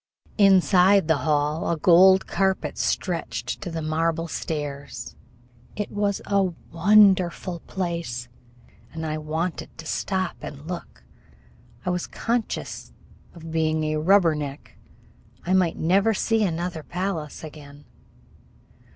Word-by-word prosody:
Inside 195 -1 +5
the 160 -2 +3
hall 150 +2 +1
a 170 - 0
gold 190 +4 +6
carpet 190 -1 0
stretched 150 -10 -2
to 185 - -5
the 165 -1 -4
marble 165 +1 0
stairs. 145 -6 -5 0.6
It 210 - -4
was 205 -1 -1
a 200 -1 +2 0.3
wonderful 185 -1 +4
place, 170 -10 -3 0.6
and 160 0 -5
I 155 0 -2
wanted 160 +3 -4
to 165 - -9
stop 185 +3 -2
and 145 0 -8
look. 175 +1 -7 0.8
I 180 - +1
was 180 -1 -2
conscious 235 0 -3 0.4
of 165 -1 -9
being 160 -1 +1
a 155 0 0
"rubber 175 +1 +4
neck." 145 -2 -6 0.7
I 180 - +1
might 180 -3 +2
never 195 +6 +2
see 225 +2 +1
another 175 -2 -2
palace 175 -3 -4
again. 145 -2 -11
170 Hz, 120 wpm, -24 LUFS, 155-190 Hz, 0.8 s, gold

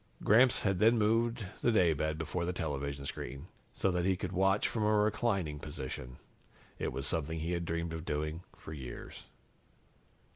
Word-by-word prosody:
Gramps 120 +4 +5
had 95 -3 +1
then 115 +3 +5
moved 115 +1 +2 0.2
the 120 - +3
daybed 80 -6 +2
before 80 +2 -2
the 90 +1 -1
television 70 -4 -3
screen, 70 +1 -5 0.3
so 95 - +1
that 90 0 0
he 95 0 +2
could 90 - -4
watch 95 +2 +3
from 110 - -2
a 105 0 +3
reclining 105 -7 +1
position. 65 -4 -6 0.6
It - - -1
was 65 +1 -3
something 80 +1 -1
he'd 85 +1 -2
dreamed 85 0 -2
of 80 -1 -5
doing 75 +1 -2 0.2
for 80 - -9
years. 65 -5 -8
85 Hz, 160 wpm, -32 LUFS, 75-105 Hz, 0.6 s, Gramps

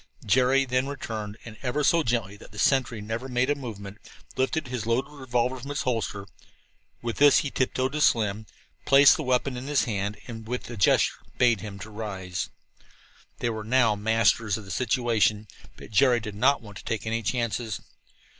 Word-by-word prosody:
Jerry 130 +5 +3
then 130 +1 0
returned, 110 -7 -5
and, 110 -2 -10 0.3
so 170 +3 +4
gently 115 -7 -1
that - - -15
the - - -12
sentry 125 -5 +1
never 115 +5 -4
made 125 +2 +1
a - - +2
movement, 105 -6 -8 0.4
lifted 135 +3 0
his 125 -3 -4
loaded 120 +5 0
revolver 130 -2 -1
from 135 +3 -8
its 145 - -2
holster. 110 -5 -2 0.8
With 115 -1 -3
this 145 -1 +7
he 140 - -3
tiptoed 130 0 0
to 150 +1 -2
Slim, 110 -4 +2 0.4
placed 140 +1 +7
the - - -4
weapon 130 -1 0
in 125 +2 -6
his 145 -2 +2
hand 105 -2 -2
and 115 -2 -8
with 125 +2 -4
a - - -5
gesture 100 - +3 0.2
bade 120 -5 +3
him 105 -2 -7
rise. 100 -5 -5 0.9
They 120 - -1
were 110 -1 -5
now 115 -1 +3
masters 110 0 +2
of 110 - -9
the 95 - -8
situation, 110 -3 +1 0.3
but - - -12
Jerry 125 +2 +4
did 105 -2 -7
not 130 +5 +2
want 105 -2 -11
to - - -10
take 115 -1 -3
any 115 +1 -1
chances. 115 -1 -2
115 Hz, 180 wpm, -26 LUFS, 105-130 Hz, 0.9 s, this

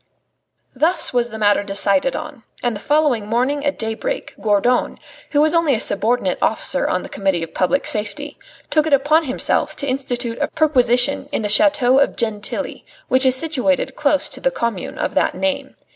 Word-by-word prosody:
Thus 320 +4 +1
was 240 -1 +1
the 220 - -8
matter 205 -1 +2
decided 200 +4 +1
on. 300 -4 -7 0.2
And 240 -2 0
the - - -6
following 285 -6 +1
morning 255 +6 0
at 285 -1 -1
daybreak, 225 - -3
Gourdon, 215 +4 +1 0.3
who 290 - +2
was 310 +1 +3
only 330 -5 +2
a - - -2
subordinate 220 +5 +1
officer - - 0
on - - -1
the - - -7
Committee 190 -4 -1
of 165 - -8
Public 190 +10 0
Safety, 220 +7 -2 0.3
took 310 0 +2
it 305 - 0
upon 300 +4 +3
himself 260 - 0
to 280 - -2
institute 245 -3 -3
a 290 - +1
perquisition 270 -2 +2
in 225 - -2
the 210 - -1
chateau 265 +2 +4
of 280 - +1
Gentilly, 220 -3 -2 0.3
which 260 +1 +3
is 260 - +5
situated 285 -2 0
close 290 -1 +1
to - - -5
the - - +2
commune 235 - -4
of - - -2
that - - +1
name. 280 -1 -2
260 Hz, 180 wpm, -19 LUFS, 220-290 Hz, 0.3 s, is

